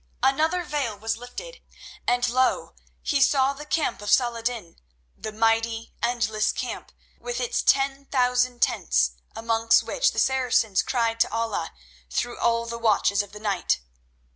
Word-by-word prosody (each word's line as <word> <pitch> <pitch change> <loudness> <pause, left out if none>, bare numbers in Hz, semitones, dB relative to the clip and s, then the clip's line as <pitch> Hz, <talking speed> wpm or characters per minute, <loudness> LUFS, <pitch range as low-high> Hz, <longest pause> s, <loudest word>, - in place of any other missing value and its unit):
Another 315 +6 +2
veil 280 -10 -2
was 225 +2 -2
lifted, 245 - -9 0.5
and 245 +1 +2
lo! 255 +1 +1 0.3
he 280 -2 +1
saw 270 0 +4
the 295 +2 -10
camp 310 -9 -1
of 205 - -5
Saladin, 235 -6 0 0.4
the 215 - -6
mighty, 225 +1 0
endless 225 -3 +1
camp, - - -5 0.3
with 245 0 -4
its 245 -2 0
ten 275 0 +2
thousand 250 -2 +1
tents, 60 -1 +2 0.2
amongst 225 0 +2
which - - +1
the - - -12
Saracens 250 -6 +2
cried 230 -2 -1
to 235 - +2
Allah 225 -7 -2 0.4
through 240 - -2
all 230 0 +1
the 235 0 -5
watches 210 -2 +2
of 205 - -10
the 210 - -10
night. 200 - 0
235 Hz, 145 wpm, -25 LUFS, 225-260 Hz, 0.5 s, saw